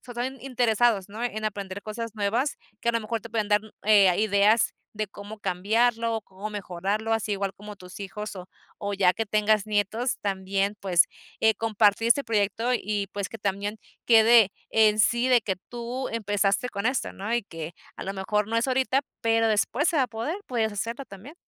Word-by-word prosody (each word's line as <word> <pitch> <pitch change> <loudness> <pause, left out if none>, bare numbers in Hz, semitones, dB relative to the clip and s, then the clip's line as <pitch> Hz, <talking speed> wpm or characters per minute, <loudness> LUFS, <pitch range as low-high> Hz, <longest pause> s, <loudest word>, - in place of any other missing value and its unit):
o 245 - -6
sea 240 - -2
están 265 0 -8
interesados, 240 -5 +2
¿no?, 215 +3 -7
en 215 -2 -3
aprender 200 -2 -4
cosas 225 +1 -6
nuevas 225 +7 0 0.2
que - - -2
a - - +4
lo 230 - +1
mejor 225 +1 -3
te 230 - -11
pueden 215 -2 0
dar, 210 0 +4
mm, 220 - -14
eh, 205 -2 +6
ah, 180 - +2
ideas 210 +1 +3 0.2
de 215 0 -2
cómo 205 +2 -10
cambiarlo 225 +5 +1
o - - -3
cómo 195 +2 -8
mejorarlo, 205 +2 -2
así 220 -1 0
igual 195 -1 -2
como 210 +1 -10
tus 180 0 -12
hijos 210 +2 -6
o 180 - -8 0.3
o 200 0 -3
ya 185 -2 +4
que 225 +2 -3
tengas 210 0 +2
nietos 215 +4 0
también, 195 +1 -1
pues, 180 -3 +4 0.4
eh, 220 0 +4
compartir 220 0 +2
este 275 +4 +4
proyecto 220 +2 0
y 205 -2 -1
pues 200 -2 -3
que 225 - -9
también 205 +1 -2 0.3
quede 225 -2 +7 0.2
en 215 -1 +4
sí 235 +4 +3
de 250 -2 +5
que 200 -3 -2
tú 245 +2 -4
empezaste 205 0 0
con 200 0 -3
esto, 255 0 -1
¿no? 205 +4 -5
Y 240 0 +1
que 165 -2 -7 0.2
a - - -6
lo 195 - -3
mejor 205 +2 -1
no 230 - 0
es 230 - +2
ahorita, 265 +1 +1 0.2
pero 225 -1 +2
después 230 - +1
se 330 - +1
va 280 - +4
a - - -4
poder, 235 - -3
puedes 225 -3 0
hacerlo 230 +6 -4
también. 220 - -12
215 Hz, 205 wpm, -26 LUFS, 200-230 Hz, 0.4 s, quede